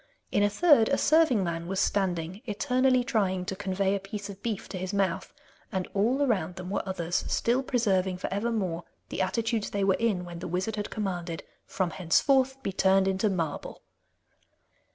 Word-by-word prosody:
In - - +2
a 205 - +4
third, 275 -1 +5
a 280 - +2
serving 310 -10 +4
man 170 -1 -3
was 190 +1 -2
standing 185 -2 0
eternally 255 +3 +2
trying 195 -7 0
to 190 - -3
convey 195 0 0
a 200 - 0
piece 200 +1 -6
of 195 0 -13
beef 220 -4 -3
to 185 - -5
his 185 +2 -3
mouth, 190 -3 0 0.4
and 190 -1 -2
all 240 +8 +2
around 210 -8 0
them 185 0 -7
were 205 - 0
others, 175 -2 -1
still 245 +3 +1
preserving 195 -8 +1
for 185 - -4
evermore 200 -5 -1 0.3
the - - -2
attitudes 225 +2 0
they 200 -1 -1
were 195 0 +4
in 200 -4 0
when 170 -1 -8
the - - -5
wizard 185 +5 -2
had 210 -1 -4
commanded 175 -5 -3 0.2
'From 185 -3 -1
henceforth 265 - +2
be 195 - -2
turned 190 0 +3
into 190 +3 +1
marble. 165 -6 -3
195 Hz, 180 wpm, -28 LUFS, 185-230 Hz, 0.4 s, third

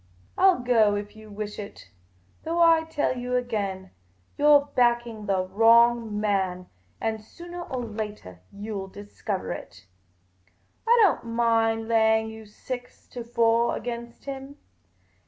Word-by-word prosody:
I 375 - +2
'11 350 -10 +1
go 225 -4 +4
if 205 +1 -6
you 215 0 -13
wish 210 0 -6
it; 200 - -10 0.5
though 335 +2 -2
I 330 -1 +5
tell 295 -5 -1
you 250 0 -3
again, 200 -6 -3 0.4
you 295 - +1
're 290 -1 +7
backing 235 -3 +1
the 190 -2 +1
wrong 225 +2 +4
man, 190 -3 -1 0.3
and 220 -1 -2
soonah 345 +9 -10
or 250 -2 -3
latah 210 - -7
you 205 0 -6
'11 190 0 -9
discover 205 -1 -5
it. 105 - -9 1.0
I 475 +1 +6
don't 305 - +2
mind 225 -1 +2
laying 220 -1 +3
you 220 -1 -11
six 245 +4 -8
to 245 - -7
four 235 0 +2
against 235 -1 -7
him. 275 +1 -7
225 Hz, 140 wpm, -26 LUFS, 210-245 Hz, 1.0 s, re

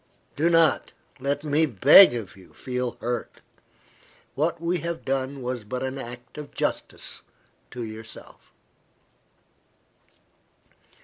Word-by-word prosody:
Do 160 +4 +2
not, 165 -2 +3 0.3
let 140 +2 -2
me 155 +1 +2
beg 135 - +8
of 110 -5 -6
you, 95 -1 -18
feel 125 -1 -3
hurt. 120 +1 -4 0.9
What 165 +3 -1
we 170 +2 -1
have 170 +1 -5
done 135 0 -2
was 125 -2 -3
but 125 +5 -4
an 130 +1 -4
act 120 +3 -9
of 150 -1 -10
justice - - -3 0.5
to 125 -1 -6
yourself." 110 0 -10
130 Hz, 115 wpm, -25 LUFS, 120-155 Hz, 0.9 s, beg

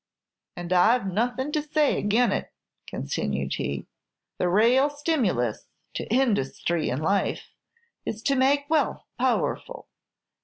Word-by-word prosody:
And 175 0 -3
I 215 +7 +5
've 240 - -8
nothing 245 +8 -1
to 305 - 0
say 300 0 +1
agin 220 +2 +2
it," - - -3 0.4
continued 70 0 -3
he. 70 - -3 0.5
"The 180 - +1
raal 240 +9 +4
stimulus 260 - -1 0.3
to - - -4
industhry 175 - +1
in 130 +5 -2
life, 195 +4 0 0.5
is 220 +1 -5
to 275 - +2
make 280 +2 +2
wealth 315 0 0
powerful. - - -1
230 Hz, 125 wpm, -26 LUFS, 175-280 Hz, 0.5 s, I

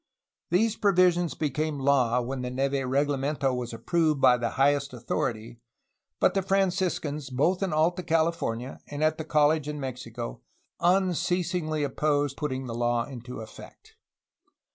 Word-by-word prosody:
These 220 +5 +2
provisions 180 -4 +3
became 150 0 -2
law 130 -3 +2
when 130 +2 -4
the 125 - -3
Neve 135 +1 -1
reglamento 140 0 0
was 125 -1 -4
approved 155 +6 0
by 125 - +6
the 120 -1 -1
highest 140 0 +2
authority, 115 -1 -3 0.6
but - - +3
the 195 - +1
Franciscans, 180 -6 0
both 150 +9 +1
in 195 -3 0
Alta 165 +4 +2
California 160 -7 -1
and 145 +1 -4
at 155 +1 +2
the - - -2
college 150 -1 +2
in 150 0 -4
Mexico, 125 - -6 0.4
unceasingly 180 -3 +1
opposed 145 0 0
putting 135 -3 -3
the 120 - -5
law 120 0 0
into 125 -3 -8
effect. 110 - -13
145 Hz, 140 wpm, -27 LUFS, 130-165 Hz, 0.6 s, by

